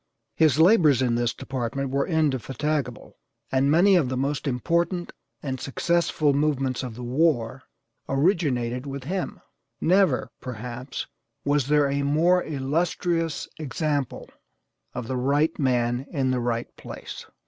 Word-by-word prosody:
His 155 -4 +4
labors 160 - +5
in 120 -2 +1
this 120 0 +1
department 130 0 -4
were 140 +1 0
indefatigable, 150 - -1 0.3
and 135 +1 +2
many 180 +6 +5
of 155 -8 +3
the 130 - -2
most 140 +2 -1
important 170 +7 0 0.3
and 130 -3 -3
successful 155 0 +1
movements 135 -3 0
of 125 -4 -6
the 125 - -7
war 125 -2 +1 0.5
originated 135 - +1
with 140 -1 -5
him. 185 +6 -4 0.4
Never, 180 -6 +2
perhaps, 125 +2 -6 0.4
was 145 -2 +2
there 145 -1 +4
a 140 +1 0
more 165 +6 +3
illustrious 165 +3 -1
example 145 -2 -2 0.7
of 125 -2 -4
the 130 - -2
right 145 +6 +1
man 125 -1 +1
in 135 -5 0
the 130 - 0
right 120 -1 -2
place. - - -9
140 Hz, 130 wpm, -25 LUFS, 125-160 Hz, 0.7 s, labors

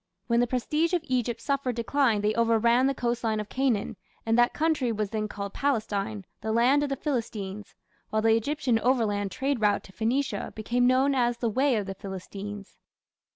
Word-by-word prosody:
When 235 0 +2
the 245 - +3
prestige 300 +8 0
of 345 -3 +1
Egypt 245 -3 -1
suffered 275 -4 -1
decline 235 -2 +1
they 210 +1 +1
overran 235 +2 +3
the 275 - 0
coastline 235 -3 -1
of 210 - -5
Canaan, 255 -6 0 0.3
and 225 0 +2
that 240 +1 +4
country 305 -6 0
was 210 -2 -2
then 215 -1 -1
called 200 -1 -6
Palestine, 215 -6 -1 0.2
"the 220 - -2
land 245 +6 +4
of 290 - -1
the 275 - -1
Philistines", 215 -8 -4 0.3
while 215 0 0
the 225 0 +5
Egyptian 255 0 0
overland 220 -5 +1
trade 265 +5 -2
route 210 -1 +2
to - - -14
Phoenicia 230 0 -1
became 245 +3 +1
known 260 +2 +3
as 240 -2 +1
"the 235 -1 -1
way 260 +4 +2
of 210 -2 -1
the 195 - -5
Philistines". 200 +1 -8
235 Hz, 185 wpm, -27 LUFS, 215-260 Hz, 0.3 s, the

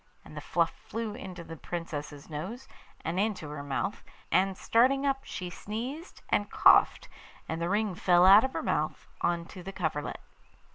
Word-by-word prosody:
And - - -12
the - - -5
fluff - - +1
flew 225 -2 -5
into 185 -7 -8
the 165 - -8
Princess's 150 -3 -6
nose, 190 - -6 0.4
and 170 +3 -1
into 200 -7 -1
her 150 -1 -6
mouth, 145 +8 -2 0.3
and 190 +1 +2
starting 265 +4 +3
up 275 -1 +1
she 180 -2 -5
sneezed 245 - -6
and 205 - +1
coughed, - - +5 0.4
and 160 +1 -3
the 170 - 0
ring 210 0 +1
fell 180 -1 +4
out 200 +3 +9
of 265 - -1
her - - -3
mouth - - -1 0.2
on 170 -1 0
to 185 - -9
the 190 +2 -7
coverlet. 160 -6 -3
185 Hz, 175 wpm, -29 LUFS, 165-220 Hz, 0.4 s, out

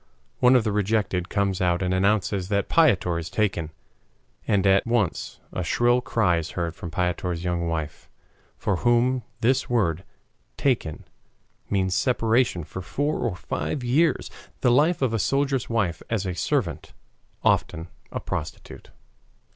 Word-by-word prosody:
One 125 +1 +6
of 125 - +4
the 110 - 0
rejected 100 -3 0
comes 100 -2 0
out 90 0 +1
and 90 0 0
announces 100 -1 +1
that 100 -1 0
Piotr 95 - +3
is 85 0 -6
taken, 95 -7 -1 0.8
and 100 -2 +2
at 95 +3 +4
once 115 -6 -1
a 90 - -2
shrill 120 +8 +2
cry 105 -8 +1
is 80 -1 -3
heard 85 -2 -1
from 85 - -7
Piotr's 90 +1 -2
young 85 -1 -1
wife, 80 -2 -4 0.5
for 100 - -1
whom 120 +3 +2 0.2
this 130 +3 +2
word 95 -8 +1 0.5
"taken" 120 - 0 0.7
means 95 -2 +1
separation 115 - +1
for 90 +5 -7
four 145 - -2
or 110 -6 -1
five 130 - -3
years, 140 +5 +1 0.3
the 125 - +4
life 150 +5 +3
of 120 -4 +1
a 115 - 0
soldier's 135 +2 0
wife 100 -8 0
as 110 -4 -1
a 90 - -2
servant, 95 - -2 0.5
often 85 0 +1 0.2
a - - -3
prostitute. - - -6
100 Hz, 145 wpm, -25 LUFS, 90-120 Hz, 0.8 s, One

